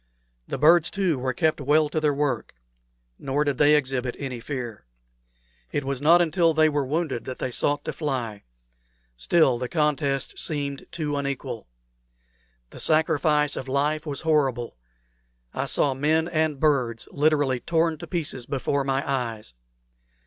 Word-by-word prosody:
The - - -3
birds, 165 +4 +5
too, 180 -8 0
were 130 +1 -1
kept 155 +4 0
well 150 +3 +3
to 155 - -1
their 150 -1 +2
work; 145 - -2 0.6
nor 140 +2 0
did 145 -3 -2
they 150 +1 +6
exhibit 130 -3 -1
any 130 -4 -5
fear. 120 - -6 0.8
It 145 - -1
was 135 -1 -3
not 170 +4 +6
until 165 0 +2
they 155 0 +5
were 145 -1 0
wounded 145 -6 -2
that 130 - -6
they 130 - -3
sought 145 +4 0
to - - -3
fly. 125 -9 -3 0.7
Still, 125 - +3
the 125 0 -3
contest 145 -4 0
seemed 140 -3 -2
too 150 -3 -3
unequal. 140 - -4 1.0
The - - -11
sacrifice 155 -2 +2
of 130 - -5
life 150 +4 0
was 140 -2 -3
horrible. 135 - 0 0.8
I - - -2
saw 140 - +1
men 155 +4 +1
and 155 -4 0
birds 130 -7 +1
literally 145 -3 +2
torn 165 +1 0
to - - -8
pieces 150 -8 -3
before 140 0 -1
my 135 0 -1
eyes. 115 - -3
145 Hz, 150 wpm, -25 LUFS, 130-155 Hz, 1.0 s, they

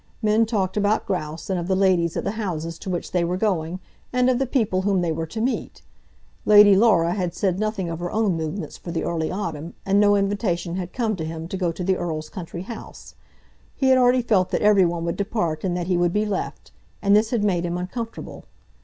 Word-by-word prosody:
Men 215 +1 +3
talked 205 -4 -1
about 210 +1 +1
grouse, 160 -5 -4
and 190 -2 -1
of 170 - -4
the 190 - +2
ladies 185 -3 +2
at - - -2
the - - -1
houses 165 -7 -4
to 195 - -6
which 175 -2 -3
they 180 -1 +1
were 175 +2 -1
going 185 -4 -1 0.3
and 250 0 +3
of 250 - 0
the 270 - 0
people 215 -8 +1
whom 195 -1 +1
they 170 -2 0
were 160 +1 -3
to 220 - -6
meet. 250 +4 -2 0.6
Lady 205 -1 +7
Laura 190 -6 +4
had 180 -3 -2
said 185 -1 0
nothing 215 -4 -1
of 165 -1 -4
her 175 0 -3
own 215 -3 +1
movements 160 +1 -4
for - - -10
the 170 - -2
early 160 -2 -1
autumn, 170 -4 -5
and 195 +1 +3
no 205 0 +5
invitation 195 -4 -1
had 180 -1 -4
come 225 -4 -1
to 160 - -4
him 160 +1 -5
to - - -4
go 180 -3 0
to 180 - -6
the 190 +1 +1
Earl's 155 -2 -4
country 175 -1 -7
house. 230 +3 -10 0.6
He 265 - +2
had 260 0 +6
already 250 0 +4
felt 195 -6 +2
that - - -1
every 205 -3 +5
one 170 -1 -2
would 170 - -2
depart 185 -7 -2
and 180 -2 -1
that 175 - -2
he 180 0 +1
would 175 0 +1
be 210 +1 +1
left, 200 -3 -4 0.3
and 200 0 +5
this 215 +1 +3
had 230 -4 0
made 180 -4 +1
him 175 0 -2
uncomfortable. 225 +6 -6
185 Hz, 235 wpm, -23 LUFS, 170-210 Hz, 0.6 s, Lady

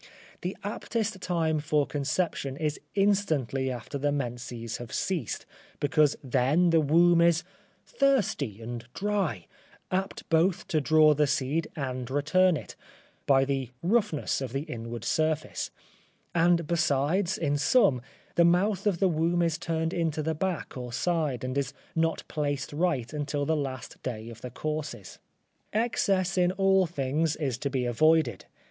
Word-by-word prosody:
The 180 +2 -4
aptest 215 0 -2
time 165 -4 0
for 150 -1 +1
conception 145 -1 -2
is 150 -1 -2 0.2
instantly 160 - +1
after 125 +3 -5
the 145 +1 +1
menses 120 -4 -4
have 120 -2 -9
ceased, 165 - -2 0.3
because 150 0 +3
then 135 +7 +2
the 165 -1 +5
womb 170 +3 +5
is 170 0 +4 0.4
thirsty 215 - +1
and 120 0 -5
dry, 190 - -1 0.5
apt 190 +1 -2
both 165 +3 +2
to 155 - +2
draw 155 +1 +5
the 150 0 +2
seed 140 +4 0
and 130 -4 -4
return 155 +6 +3
it, - - -9 0.5
by 135 -1 +5
the 135 -3 -2
roughness 195 -8 +1
of 130 -3 -4
the 135 +1 -1
inward 115 -6 -6
surface, 155 -1 0 0.6
and 170 0 +3
besides, 170 +5 +1
in 145 -6 0
some, 145 - +3 0.3
the 170 - +4
mouth 185 +5 +2
of 195 -4 +2
the 190 - +3
womb 170 +1 +1
is 165 -2 0
turned 165 0 -1
into 160 -3 -1
the 160 +1 0
back 180 0 -3
or 125 -2 -6
side, 150 -3 -1
and 130 +1 -3
is 135 -1 -3 0.2
not 165 0 +1
placed 145 -2 -2
right 150 -6 0
until 145 -1 -2
the 160 +2 +1
last 135 -4 -5
day 115 -2 -5
of 115 -1 -11
the 125 - -6
courses. 150 -6 -5 0.5
Excess 195 -4 +1
in 180 0 +3
all 190 -1 +3
things 150 +1 0
is 135 -6 -2
to 140 - -2
be 130 -2 -1
avoided. 135 -2 +2
155 Hz, 150 wpm, -28 LUFS, 135-175 Hz, 0.6 s, the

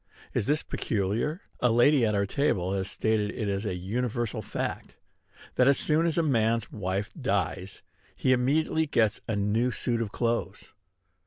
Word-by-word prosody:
Is 105 - 0
this 150 +1 +1
peculiar? 110 - -2 0.2
A 125 - +3
lady 120 +1 +4
at 105 - 0
our 100 0 +2
table 95 -6 0
has 95 0 -2
stated 110 -2 0
it 110 - -2
as 100 +2 -1
a 95 - -2
universal 115 +5 -2
fact, - - -5 0.6
that, 125 - +5
as 140 - +5
soon 160 +2 +2
as 165 - -1
a 170 - +3
man's 115 -6 +1
wife 100 0 -3
dies, 100 - -2 0.3
he 130 - +2
immediately 155 +5 +1
gets 110 -6 +1
a 110 - -1
new 105 +5 +1
suit 120 -1 -1
of 105 -3 -3
clothes. 115 -5 -2
115 Hz, 165 wpm, -28 LUFS, 100-130 Hz, 0.6 s, that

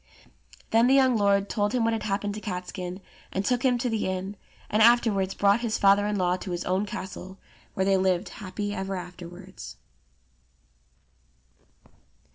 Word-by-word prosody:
Then 230 +2 +5
the 265 - +5
young 260 -2 +4
lord 200 -1 +2
told 205 0 -1
him 250 -2 +1
what 230 0 +2
had 225 - -2
happened 205 0 -2
to 210 - -7
Catskin, 180 -1 -5 0.3
and 195 +1 -2
took 245 +1 +1
him 250 -2 +3
to 245 +1 -1
the 225 -4 -1
inn, 190 +2 -3 0.3
and 215 - +1
afterwards 215 -5 +4
brought 200 +2 +3
his 230 -2 -1
father 200 +1 +4
in 210 - -1
law 180 -2 +1
to 185 - -8
his 175 0 -3
own 190 +3 0
castle, 190 0 -7 0.4
where 190 - +1
they 195 0 +3
lived 185 0 +1
happy 205 +1 -5
ever 195 0 -3
afterwards. 180 +1 -9
200 Hz, 165 wpm, -26 LUFS, 185-220 Hz, 0.4 s, Then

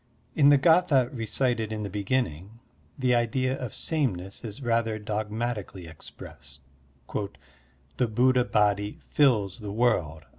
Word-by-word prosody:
In 145 -2 +5
the 145 - +7
g^tha 145 -4 +3
recited 115 -1 -1
in 105 -1 -4
the - - -3
beginning, 105 - -2 0.4
the 130 -2 +2
idea 130 +2 +1
of 125 -4 -5
sameness 100 - -3
is 115 +4 -7
rather 115 -2 0
dogmatically 105 -2 -4
expressed: 70 -3 -13 1.4
"The 125 - +2
Buddha 125 +3 +3
Body 105 -2 +1
fills 120 -8 +2
the 105 -2 -6
world." 85 -10 0
115 Hz, 120 wpm, -27 LUFS, 100-130 Hz, 1.4 s, the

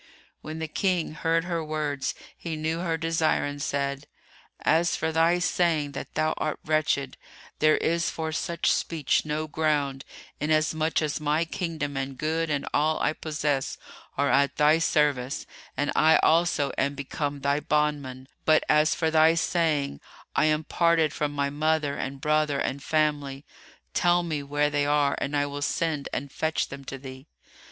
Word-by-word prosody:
When 155 +1 -6
the 160 0 -3
King 180 +1 0
heard 165 +2 +1
her 170 -2 -2
words, 150 -3 -2 0.2
he 165 -2 -5
knew 160 +2 -2
her 170 -2 -1
desire 165 -1 +1
and 145 0 -5
said, 140 -1 -2 0.5
"As 170 +1 +2
for 160 - -1
thy 165 +2 +3
saying 170 -4 +1
that 140 - -8
thou 155 0 +1
art 155 - -2
wretched, 150 -4 0 0.4
there 155 0 +4
is 170 0 0
for 160 -1 -4
such 170 +1 0
speech 155 -3 0
no 155 +1 -2
ground, 145 -3 0 0.4
inasmuch 155 +1 +1
as 150 0 -1
my 150 +2 +1
kingdom 160 -4 -3
and 135 0 -4
good 160 +2 -1
and 145 -2 -1
all 155 +1 +2
I - - +1
possess 150 -4 -2 0.4
are 140 +1 +2
at 140 0 +3
thy 150 +2 +4
service 145 -5 +1 0.3
and 145 - 0
I 160 +1 +5
also 160 -4 +3
am 140 +1 0
become 140 +1 -4
thy 140 +1 +1
bondman; 145 -4 -1 0.2
but, 155 0 +4
as 155 +1 +4
for 160 -1 0
thy 160 +1 +5
saying, 155 - 0 0.3
'I - - +3
am 155 0 +2
parted 165 -1 +2
from 150 -1 -1
my 140 -1 -1
mother 155 -1 0
and 135 0 -4
brother 150 -1 +1
and 140 0 -2
family', 145 -2 0 0.5
tell 175 0 +3
me 155 -4 -2
where 145 +1 0
they 145 0 +1
are 145 -1 +2
and 145 +1 -1
I 145 - +2
will 145 0 -5
send 155 -1 -1
and 140 +1 -4
fetch 160 +2 -1
them 140 0 -9
to 135 - -6
thee." 130 +1 -10
150 Hz, 165 wpm, -26 LUFS, 145-160 Hz, 0.5 s, I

